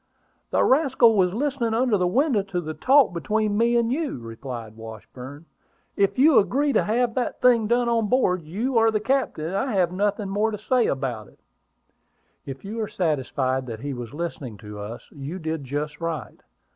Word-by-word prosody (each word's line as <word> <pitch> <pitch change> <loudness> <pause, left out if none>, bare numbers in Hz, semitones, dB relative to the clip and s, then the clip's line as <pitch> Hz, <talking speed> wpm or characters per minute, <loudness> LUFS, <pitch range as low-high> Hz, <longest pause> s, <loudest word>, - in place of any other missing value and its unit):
"The - - +2
rascal 260 -5 +4
was 185 -3 +3
listening 255 -4 -1
under 245 -1 +2
that 180 -2 +1
window 255 - +2
to 195 -2 -4
the 155 -2 -5
talk 260 - +4
between 210 +4 0
you 235 +1 +3
and 235 -1 +2
me," 300 +5 0
replied 115 - -7
Washburn. 125 +6 -10 0.5
"If 200 +4 +1
you 290 +3 +6
agree 280 +7 +1
to - - +4
have 235 +2 +1
that 250 0 -2
thing 235 -4 +4
done 240 +1 +2
on 230 -2 +1
board, 200 -7 +2
you 225 - -1
are 225 0 +4
the 215 -1 0
captain, 255 - -1
and 175 +4 -3
I 255 +4 -1
have 180 -3 +2
nothing 205 +2 -1
more 205 +3 0
to 210 - -4
say 240 +3 +1
about 125 -6 -3
it." - - -22 1.1
"If 135 +6 -8
you 220 +3 -4
are 215 - -2
satisfied 130 -6 -1
that 115 -2 -6
he 140 0 -4
was 120 -3 -7
listening 145 -8 -5
to 105 -1 -10
us, 105 +3 -8
you 145 +5 -6
did 160 -4 -4
just 145 +3 -4
right. 165 -2 -5
195 Hz, 190 wpm, -24 LUFS, 145-235 Hz, 1.1 s, you